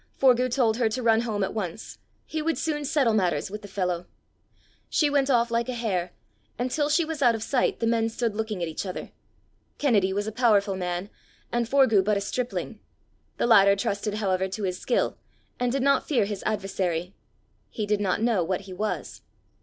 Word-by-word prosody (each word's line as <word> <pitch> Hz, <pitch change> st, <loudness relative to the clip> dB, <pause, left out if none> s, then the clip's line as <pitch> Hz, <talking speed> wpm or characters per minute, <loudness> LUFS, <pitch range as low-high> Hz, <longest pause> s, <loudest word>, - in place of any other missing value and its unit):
Forgue 255 Hz, -1 st, +4 dB
told 235 Hz, -3 st, +2 dB
her 235 Hz, -3 st, +2 dB
to 250 Hz, +3 st, -3 dB
run 225 Hz, -1 st, +4 dB
home 215 Hz, -4 st, -1 dB
at 190 Hz, -, -2 dB
once: 205 Hz, -2 st, -5 dB, 0.3 s
he 315 Hz, -, -3 dB
would 325 Hz, +1 st, 0 dB
soon 300 Hz, -2 st, -2 dB
settle 270 Hz, -5 st, +2 dB
matters 190 Hz, -2 st, 0 dB
with 210 Hz, +1 st, -6 dB
the 205 Hz, -, -9 dB
fellow. 180 Hz, -3 st, -2 dB, 0.8 s
She 295 Hz, -2 st, +2 dB
went 280 Hz, -1 st, +2 dB
off 240 Hz, -2 st, +3 dB
like 235 Hz, +1 st, 0 dB
a 250 Hz, -, -2 dB
hare, 185 Hz, -7 st, -1 dB, 0.5 s
and 245 Hz, +1 st, -2 dB
till 295 Hz, +1 st, 0 dB
she 315 Hz, +2 st, +3 dB
was 315 Hz, -2 st, -5 dB
out 240 Hz, -3 st, +5 dB
of 220 Hz, -, -4 dB
sight 255 Hz, 0 st, 0 dB
the -, -, 0 dB
men 225 Hz, 0 st, +2 dB
stood 225 Hz, -1 st, -2 dB
looking 215 Hz, -4 st, -3 dB
at -, -, -1 dB
each 160 Hz, -, -4 dB
other. 185 Hz, -2 st, -6 dB, 0.7 s
Kennedy 210 Hz, -9 st, +2 dB
was 205 Hz, +2 st, -1 dB
a 220 Hz, -, -3 dB
powerful 210 Hz, -4 st, +2 dB
man, 180 Hz, +1 st, -3 dB, 0.4 s
and 240 Hz, -1 st, 0 dB
Forgue 260 Hz, -8 st, +4 dB
but 210 Hz, +1 st, +1 dB
a -, -, -2 dB
stripling; 250 Hz, +4 st, -3 dB, 0.6 s
the -, -, +1 dB
latter 200 Hz, -4 st, +6 dB
trusted, 200 Hz, +1 st, -2 dB
however, 190 Hz, -3 st, 0 dB
to 200 Hz, +2 st, -5 dB
his 185 Hz, -1 st, -2 dB
skill, -, -, 0 dB, 0.4 s
and 245 Hz, 0 st, +1 dB
did 270 Hz, 0 st, 0 dB
not 280 Hz, 0 st, +2 dB
fear 250 Hz, -9 st, +2 dB
his 200 Hz, -1 st, -4 dB
adversary. 190 Hz, -4 st, -2 dB, 0.6 s
He 215 Hz, -, -3 dB
did 205 Hz, 0 st, 0 dB
not 200 Hz, +2 st, 0 dB
know 225 Hz, -7 st, +2 dB
what 185 Hz, +2 st, -2 dB
he 190 Hz, -1 st, -10 dB
was. 210 Hz, +4 st, -4 dB
220 Hz, 200 wpm, -26 LUFS, 195-245 Hz, 0.8 s, latter